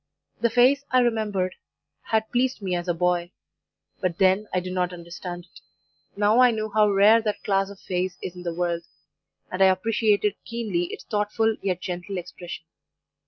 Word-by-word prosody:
"The 235 - +2
face, 250 +4 +4
I 255 - +3
remembered, 210 -6 0 0.5
had 220 0 0
pleased 250 0 +1
me 190 -3 -3
as 175 0 -3
a 175 - +2
boy, 175 0 +1 0.7
but 180 -3 -1
then 190 +2 +3
I 185 - +1
did 180 0 -6
not 180 -1 0
understand 175 0 -8
it; - - -17 0.6
now 210 +3 +4
I 250 -1 +7
knew 215 -2 -2
how 210 0 +4
rare 205 +3 +6
that 210 -2 -3
class 195 -1 +1
of 200 -1 -11
face 180 0 -3
is 180 - -6
in 180 - -9
the 175 -1 -3
world, 170 -1 -1 0.7
and 185 - -3
I 190 - +8
appreciated 205 +1 +2
keenly 215 -7 -2
its - - -8
thoughtful, 215 +1 0
yet 185 -3 -1
gentle 180 +2 -4
expression. 175 -1 -8
195 Hz, 175 wpm, -25 LUFS, 180-220 Hz, 0.7 s, I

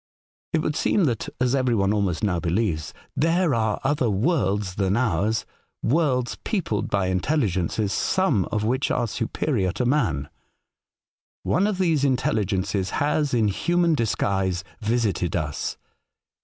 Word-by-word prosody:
It 160 -1 +2
would 150 - -1
seem 200 - +2
that 120 -8 0
(as 125 0 +2
every 130 -3 +2
one 100 -1 +2
almost 100 -5 -1
now 90 -5 +1
believes) 85 -2 -1 0.2
there 165 0 +2
are 110 -3 0
other 135 -3 +1
worlds 105 - 0
than 95 +2 0
ours 105 -2 +1 0.2
— - - -49
worlds 130 -3 +1
peopled 160 - -1
by 100 -2 +1
intelligences, 95 - 0
some 150 - +1
of 105 - -2
which 130 +5 0
are 120 -2 0
superior 110 - -1
to 125 - -1
man. 115 - +1 1.2
One 190 +5 +2
of 210 -3 -1
these 165 -6 +2
intelligences 100 -7 0
has, 145 -2 +1
in 110 -3 +3
human 170 - +1
disguise, 95 - 0 0.2
visited 105 -6 0
us. 75 -4 -3
110 Hz, 140 wpm, -24 LUFS, 95-145 Hz, 1.2 s, in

